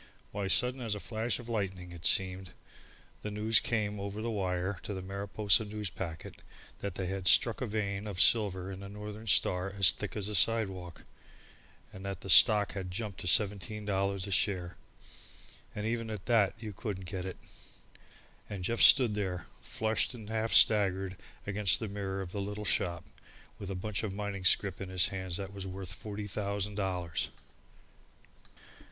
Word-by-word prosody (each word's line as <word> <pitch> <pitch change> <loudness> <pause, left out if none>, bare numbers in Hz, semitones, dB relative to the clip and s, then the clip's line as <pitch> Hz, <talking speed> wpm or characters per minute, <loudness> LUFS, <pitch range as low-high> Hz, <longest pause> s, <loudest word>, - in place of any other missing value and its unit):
Why, 100 -1 -3
sudden 125 +6 +2
as 110 -3 -2
a - - -6
flash 110 +2 -3
of 120 - -11
lightning, 95 -6 -4
it 85 -2 -2
seemed, 95 -1 0 0.7
the 105 - -5
news 105 +2 +3
came 105 -3 -2
over 100 +1 -5
the 115 +1 -3
wire 95 -1 -2
to 105 - -6
the 95 - -5
Mariposa 100 +3 +1
Newspacket, 95 -6 -6 0.4
that 100 -3 -5
they 95 - -3
had 95 0 -4
struck 115 +4 +4
a 125 - -2
vein 100 -1 -3
of 100 -3 -5
silver 95 -3 +3
in 95 - -8
the 100 0 -9
Northern 105 +2 -9
Star 90 -1 +2
as 95 -2 +6
thick 105 - -6
as 100 -1 -3
a 105 - -4
sidewalk, 95 -4 0 0.9
and 95 - -10
that 100 0 -5
the 95 - -2
stock 105 +3 +7
had 95 -2 -6
jumped 100 +1 -5
to - - -5
seventeen 105 +2 +2
dollars 100 -1 -1
a 100 - -7
share, 90 -3 0 1.0
and 105 - -4
even 115 0 -2
at 105 -3 -6
that 110 -5 +2
you 110 -2 -7
couldn't 95 -2 -6
get 90 0 -5
it! 95 - -7 1.1
And 95 -3 -6
Jeff 115 +5 -1
stood 125 -6 +8
there 95 -4 -3 0.2
flushed 110 +3 -1
and 110 -2 -10
half 110 0 -1
staggered 95 -3 +6 0.3
against 100 -2 +2
the 110 - -4
mirror 95 -1 -4
of 90 -2 -7
the 100 - -4
little 105 +1 -5
shop, 85 -2 -1 0.5
with 100 - -7
a 95 - -4
bunch 95 +1 -3
of 100 -3 -4
mining 100 -2 -5
scrip 95 0 +3
in 95 - -6
his 95 -1 +2
hand 95 -2 -5
that 100 +2 -4
was 95 -1 -7
worth 95 0 -7
forty 105 0 -7
thousand 100 0 -3
dollars! 90 -5 -2
100 Hz, 175 wpm, -31 LUFS, 95-105 Hz, 1.1 s, stood